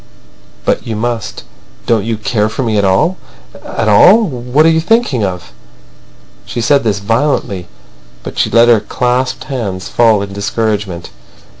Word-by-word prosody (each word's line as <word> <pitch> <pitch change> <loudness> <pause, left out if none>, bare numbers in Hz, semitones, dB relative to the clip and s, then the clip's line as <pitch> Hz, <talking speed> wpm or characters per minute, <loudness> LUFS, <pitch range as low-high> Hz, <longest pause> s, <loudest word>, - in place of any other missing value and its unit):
"But - - -1
you 115 - -3
must. 115 -1 -4 0.4
Don't 115 -3 +1
you 115 -1 -2
care 105 0 -1
for 115 +5 -3
me 110 -3 -1
at - - +1
all—at 105 - -2
all? 180 - +6
What 130 - 0
are - - +6
you 160 0 +2
thinking 180 - +1
of?" 90 -3 -5 0.9
She - - -6
said 140 +5 +2
this 105 -3 0
violently, 100 -4 -1 0.6
but - - -7
she - - +2
let 115 +1 +4
her 115 -2 +5
clasped 125 +5 -1
hands 105 -9 -5
fall 110 -4 +3
in 100 -1 -8
discouragement. 100 -3 -3
115 Hz, 150 wpm, -14 LUFS, 100-130 Hz, 0.9 s, all